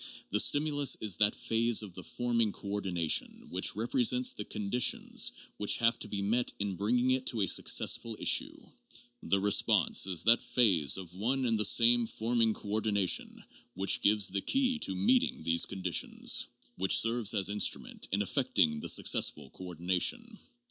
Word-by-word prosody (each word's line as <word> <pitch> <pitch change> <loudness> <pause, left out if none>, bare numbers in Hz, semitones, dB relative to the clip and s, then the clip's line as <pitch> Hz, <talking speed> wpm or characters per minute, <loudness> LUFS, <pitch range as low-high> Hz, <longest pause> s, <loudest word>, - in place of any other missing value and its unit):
The 105 - +2
stim 145 +7 +4
ulus 145 -2 0
is 105 -5 -1
that 105 -1 +1
phase 115 0 0
of 100 -4 -11
the 90 - -10
forming 115 -3 -2
coordination 95 -6 -3
which - - -1
represents 120 +3 0
the 105 - -7
conditions 105 +4 -1 0.3
which 105 - +1
have 115 0 0
to - - -6
be 100 -1 -5
met 115 +5 -1
in 100 -2 -4
bringing 120 +7 -1
it 130 0 -2
to 115 - -2
a 95 - 0
successful 110 +5 +2
issue; - - +1 0.6
the 100 - -1
response 100 -1 +2
is 90 -3 +1
that 115 +2 +5
phase 110 - +2
of 90 -3 -11
one 125 +8 -3
and 115 -2 -1
the - - +5
same 120 +2 +4
forming 115 0 -2
coordination 100 -2 -2 0.3
which 95 +2 +2
gives 105 -1 +2
the 100 +1 -3
key 255 - -1
to - - -2
meeting 255 +4 -1
these 85 0 +2
conditions, 95 -4 -1 0.3
which 95 +1 +2
serves 115 -2 +1
as 100 -2 +3
instrument 105 0 -1
in 100 +2 -1
effecting 75 -5 -1
the - - -3
successful 70 -3 +1
coordina 90 0 -5
tion. - - -1
105 Hz, 160 wpm, -29 LUFS, 95-120 Hz, 0.6 s, that